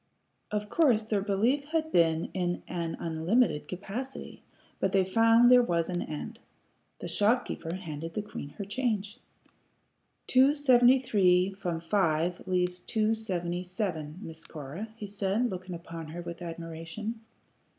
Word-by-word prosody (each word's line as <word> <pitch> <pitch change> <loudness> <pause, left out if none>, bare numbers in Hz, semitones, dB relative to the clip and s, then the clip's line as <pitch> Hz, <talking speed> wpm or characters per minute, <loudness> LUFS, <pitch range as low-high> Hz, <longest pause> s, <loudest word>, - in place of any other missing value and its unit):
Of 210 0 -2
course 245 -4 +3
their 215 -2 0
belief 225 +8 +1
had 315 +1 -1
been 165 -1 +2
in 175 -2 -1
an 170 -2 -3
unlimited 165 +1 +1
capacity, 210 +9 -6 0.4
but 190 - 0
they 190 -1 +4
found 230 +5 +5
there 250 0 +8
was 170 -7 0
an 175 -1 -1
end. 215 +9 -6 0.6
The - - -4
shopkeeper 205 -6 0
handed 165 -3 -6
the 210 - -1
queen 175 -8 -7
her 200 - -4
change. 210 -2 -2 1.1
"Two 265 +3 +5
seventy 255 -3 +6
three 190 -6 +3
from 175 -4 -3
five 170 -1 0
leaves 180 -1 0
two 220 +3 +1
twenty 180 -5 -2
seven, 180 -4 -4
Miss 160 -2 -8
Cora," 155 +8 -7
he 215 - -7
said, 205 +4 -1
looking 185 -1 -5
upon 165 -1 -8
her 170 +3 -7
with 170 0 -7
admiration. 165 +6 -6
190 Hz, 140 wpm, -29 LUFS, 170-225 Hz, 1.1 s, there